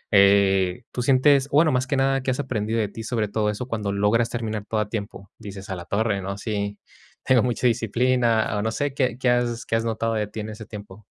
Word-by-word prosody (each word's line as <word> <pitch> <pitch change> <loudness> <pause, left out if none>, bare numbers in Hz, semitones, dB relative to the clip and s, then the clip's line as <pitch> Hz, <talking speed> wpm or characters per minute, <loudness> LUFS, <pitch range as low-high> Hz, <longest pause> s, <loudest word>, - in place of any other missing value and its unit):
Eh, 100 0 +4
tú 125 - -3
sientes 135 +2 +4
bueno, 155 +2 +4
más 130 0 0
que 140 - 0
nada, 135 0 +2
¿qué 130 - -3
has 125 - -3
aprendido 115 -5 -2
de 105 - +1
ti, 110 - -8
sobre 110 -1 -1
todo 105 0 0
eso 105 +4 -4
cuando 105 -5 -2
logras 105 +4 +2
terminar 110 -3 -3
todo 110 - -1
a 105 - -3
tiempo? 100 -2 -6
Dices: 100 0 -9
"A 95 - -3
la 85 -1 -8
torre, 100 -1 0
¿no? 100 +1 -5
Sí, 100 -1 -3 0.5
tengo 130 -2 +4
mucha 125 0 -1
disciplina", 120 -1 +1
o, 105 - 0
no 110 +1 -1
sé, 140 +5 -2
¿qué 130 -3 0
qué 130 -1 +1
has 120 -1 0
qué - - -1
has 115 0 0
notado 115 0 -1
de 105 -1 -1
ti 105 - -8
en 105 - -6
ese 110 +1 -8
tiempo? 105 -1 -11
110 Hz, 235 wpm, -24 LUFS, 105-125 Hz, 0.5 s, Eh